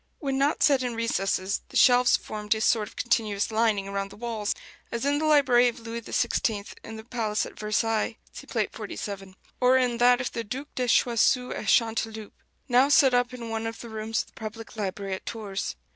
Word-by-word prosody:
When 270 -2 -2
not 285 +3 +2
set 275 -3 +4
in 245 -2 -2
recesses, 195 -4 -1
the - - -3
shelves 250 -1 +6
formed 210 0 -2
a 220 - -4
sort 220 -1 +2
of - - -15
continuous 215 -4 0
lining 215 -3 +1
around 200 0 -3
the - - -13
walls, 225 -2 -2 0.4
as 235 +3 -3
in 285 +1 +2
the 310 - -1
library 275 -5 +5
of 240 - -3
Louis 230 0 -6
XVI 220 -2 -1
in 225 - -8
the 220 - -9
palace 220 -3 -1
at - - -12
Versailles 215 +1 0 0.2
(see - - -10
Plate - - -1
XLVII), 195 -2 -6 0.2
or 255 +1 +5
in 245 -2 +1
that 245 0 +5
of 255 - -3
the 230 - -4
Duc 265 +7 -6
de 250 -1 -1
Choiseul 245 +1 +3
at 215 - -6
Chanteloup, 220 -2 +1 0.3
now 255 +2 +4
set 275 -2 +5
up 245 0 +2
in 240 -2 -7
one 225 0 -2
of 225 0 -6
the 235 - -9
rooms 220 0 -2
of - - -10
the - - -30
public 225 +1 -8
library 200 -2 -3
at 190 - -6
Tours. 205 -4 -4
230 Hz, 205 wpm, -26 LUFS, 215-245 Hz, 0.4 s, shelves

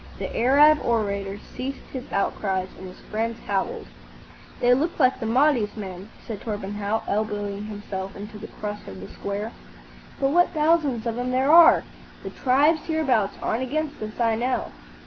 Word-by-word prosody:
The - - -5
Arab 290 +5 +6
orator 200 -4 -1 0.2
ceased 270 +2 -5
his 260 -2 -7
outcries, 190 -1 -1
and 190 - -8
his 185 - -12
friends 225 +2 -3
howled. 195 -2 -2 0.7
"They 245 0 +5
look 315 +7 0
like 260 -2 +4
the 225 - -3
Mahdi's 245 -3 +2
men," 190 -1 -7 0.2
said 220 -4 -6
Torpenhow, 205 0 -3
elbowing 205 -1 -2
himself 200 -2 -6
into 210 +1 -8
the 215 - -8
crush 210 0 -7
of 95 - -8
the 95 - -8
square; 205 +3 -4 0.7
"but 270 0 +2
what 350 +2 +3
thousands 300 -7 +2
of 230 0 -2
'em 250 +1 -1
there 260 +3 +2
are! 335 0 +8 0.4
The - - -6
tribes 290 +5 +3
hereabout 270 -11 +2
aren't 225 - 0
against 295 +2 -3
us, 215 +2 -6
I 230 -1 +3
know." 245 +3 -1
225 Hz, 165 wpm, -24 LUFS, 205-270 Hz, 0.7 s, are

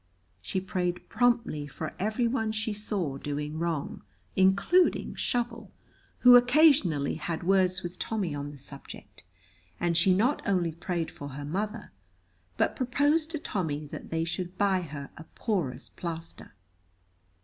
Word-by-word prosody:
She 140 - -2
prayed 180 -1 -2
promptly 235 -12 +1
for 155 +3 -6
every 220 +5 +1
one 225 -3 0
she 220 0 -1
saw 195 -9 -2
doing 150 +2 -4
wrong, 165 -4 -2 0.3
including 195 - +3
Shovel, 240 -1 -2 0.5
who 250 0 +9
occasionally 245 - +5
had 165 +1 -4
words 185 0 +2
with 175 +1 -6
Tommy 200 -8 -2
on 145 0 -4
the 145 - -10
subject, 140 +1 -10 0.6
and 175 -1 +1
she 170 +3 +4
not 230 +10 +2
only 180 -4 +2
prayed 170 0 -3
for 145 - -8
her 145 +1 -6
mother, 210 +7 -3 0.7
but - - +1
proposed 290 +5 +2
to 330 - -3
Tommy 160 - -3
that 145 - -8
they 165 0 0
should 180 +2 -4
buy 195 -2 +2
her 145 -4 -7
a 155 - -8
porous 155 - -2
plaster. 165 - -7
180 Hz, 140 wpm, -28 LUFS, 155-220 Hz, 0.7 s, who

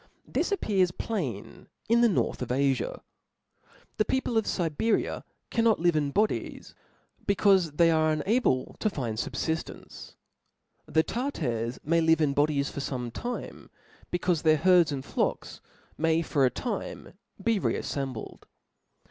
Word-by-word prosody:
This - - -1
appears 195 - +2
plain 165 - -5 0.2
in 235 +1 +4
the 240 - +5
north 190 - 0
of 125 - -2
Afia. 135 0 0 1.0
The 215 - +3
people 260 0 -1
of 220 -1 +2
Siberia 175 +5 0 0.3
cannot 230 -2 +3
live 175 -1 +2
in 145 -2 +1
bodies, 210 +9 -1 0.5
becaufc 190 -6 +3
they 170 -1 +5
are 155 -1 +3
unable 155 - +1
to 215 - +1
find 120 - -4
fubfiftence; 160 +6 -4 0.7
the 160 - +3
Tartars 130 - -2
may 165 +2 +2
live 160 0 +4
in 150 -3 +2
bodies 145 -1 +1
for - - -6
fome 125 -4 -4
time, 245 +1 -6 0.4
becaufe 175 -2 0
their 155 -1 +4
herds, 175 -1 +4
and 135 -2 -4
flocks - - -2 0.4
may, 165 +1 +2
for 140 -3 +2
a - - +4
time, 220 - -5 0.3
be 220 +1 +1
re - - 0
affembled. 135 -5 -5
160 Hz, 140 wpm, -28 LUFS, 140-200 Hz, 1.0 s, the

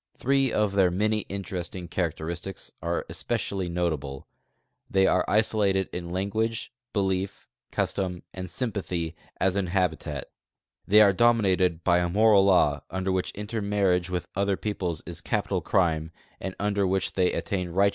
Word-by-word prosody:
Throe 135 0 +2
of 105 -2 +1
their 95 -2 +4
many 105 +4 +1
interesting 95 -2 -5
characteristics 85 +2 -4
are 85 +1 -1
especially 95 -3 -2
notable: 80 -6 -2 0.6
'riiey 95 0 +4
are 90 - +3
isolated 105 -3 +2
in 85 -1 -4
language, 110 +6 -2 0.2
belief, 95 -1 -1 0.2
custom, 90 -3 -1
and 95 -1 -6
sympathy 90 -7 -3 0.2
as 95 0 +2
in 100 -2 0
habitat; 85 -6 -1 0.6
they 105 +2 +7
are 100 -2 +6
dominated 95 -6 +3
1)V 90 -1 +3
a - - -4
moral 105 +1 +5
law 75 -8 +4
under 95 +1 -1
which 95 -1 0
intermarriage 100 -4 0
with 90 -1 -3
other 100 0 +1
[)eoples 90 -6 -3
is 85 -2 -7
ca[)ital - - -1
crime 80 -4 +1 0.3
and 95 -1 -5
under 100 -1 +1
which 95 0 0
they 90 -1 +2
attain 90 -3 -2
righteou. 100 +4 +3
95 Hz, 145 wpm, -27 LUFS, 90-100 Hz, 0.6 s, they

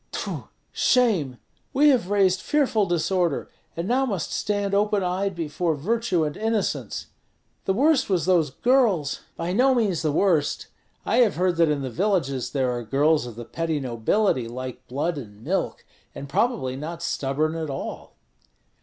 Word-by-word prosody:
Tfu! - - -5 0.2
shame! 195 - +2 0.4
We 295 +2 +5
have 245 -9 +2
raised 190 -2 +3
fearful 260 -9 +1
disorder, 175 -1 0 0.3
and 170 +2 -2
now 255 +4 +2
must 200 - -2
stand 205 -1 -1
open 205 0 +2
eyed 185 +2 -1
before 165 0 -1
virtue 190 +2 0
and 150 -1 -2
innocence. 220 -1 -2 0.6
The 190 - +1
worst 275 +1 +3
was 180 -5 +1
those 175 -5 +3
girls 210 - +2
" - - -39
"By 170 +2 -2
no 260 +5 +4
means 205 -8 +1
the 155 -2 +1
worst. 160 -2 +1 0.4
I - - +1
have 235 -5 +4
heard 180 0 +1
that 165 -2 +4
in 145 -2 0
the 130 - -4
villages 155 - 0
there 130 -3 0
are 120 -1 -3
girls 140 +5 +2
of 120 - -9
the 120 0 -8
petty 165 +3 -2
nobility 130 - 0
like 125 +1 -7
blood 145 +5 -2
and 105 -3 -12
milk, - - -2 0.3
and 140 - -7
probably 145 - 0
not 165 +5 -6
stubborn 150 0 -1
at 160 -2 -4
all." 135 - -6
170 Hz, 165 wpm, -24 LUFS, 140-205 Hz, 0.6 s, We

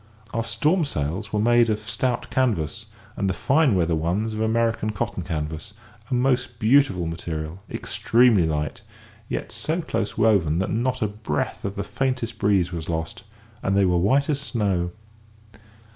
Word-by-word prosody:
Our 115 - 0
storm 155 +10 +2
sails 95 - -3
were 105 - 0
made 120 +1 +4
of 105 0 -2
stout 125 0 -1
canvas, 105 - 0 0.3
and 100 - 0
the - - -1
fine 140 -5 +3
weather 85 -2 +2
ones 90 +8 -1
of 110 - -3
American 115 -1 +1
cotton 95 -1 -3
canvas, 80 +3 -4 0.4
a 130 - +1
most 125 -1 +1
beautiful 110 -6 +3
material, 80 0 -4
extremely 115 -7 +3
light, 75 -2 -2 0.5
yet - - -3
so 160 +3 -2
close 115 -10 -2
woven 100 -8 +3
that 95 - -1
not 125 +2 0
a - - +2
breath 105 -8 -3
of 100 0 -3
the 100 - -2
faintest 125 -4 -2
breeze 95 -4 +2
was 85 -1 -5
lost, 80 +5 -3 0.4
and 95 +1 +1
they 100 - +5
were 90 -1 +3
white 135 +10 +3
as 145 -2 0
snow. 100 -10 0
105 Hz, 160 wpm, -24 LUFS, 85-120 Hz, 0.5 s, they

